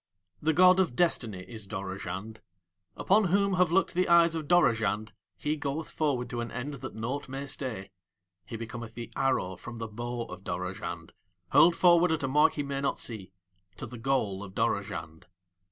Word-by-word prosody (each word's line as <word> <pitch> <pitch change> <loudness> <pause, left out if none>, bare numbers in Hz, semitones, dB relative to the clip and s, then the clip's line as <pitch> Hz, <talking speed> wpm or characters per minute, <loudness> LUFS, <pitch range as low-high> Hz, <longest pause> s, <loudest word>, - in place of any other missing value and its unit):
The 160 - +2
god 185 +3 +6
of 175 -10 +1
Destiny 115 - 0
is 110 -4 -8
Dorozhand. 95 +2 -5 0.6
Upon 205 +2 +3
whom 200 +2 +2
have 180 -2 +3
looked 190 +2 +2
the 180 0 +1
eyes 170 -1 +6
of 160 -3 -4
Dorozhand 110 - +2 0.2
he 150 +7 -1
goeth 150 +1 -4
forward 140 -6 0
to 120 - -2
an 120 - -4
end 130 +4 -4
that - - -7
naught 125 +6 -4
may 135 +1 -4
stay; 125 -8 -5 0.5
he - - -8
becometh 115 0 -7
the 120 -1 -7
arrow 110 -9 0
from 120 -1 -8
the 115 0 -4
bow 120 +2 -4
of - - -10
Dorozhand - - -5 0.4
hurled 170 0 +6
forward 175 -1 +5
at 160 -3 0
a - - +1
mark 150 +3 +4
he 145 - -2
may 140 -1 -3
not 140 - 0
see 105 -6 -4 0.5
to - - -5
the 125 - -9
goal 115 -6 0
of 95 -1 -10
Dorozhand. 100 -8 -2
125 Hz, 180 wpm, -29 LUFS, 110-160 Hz, 0.6 s, god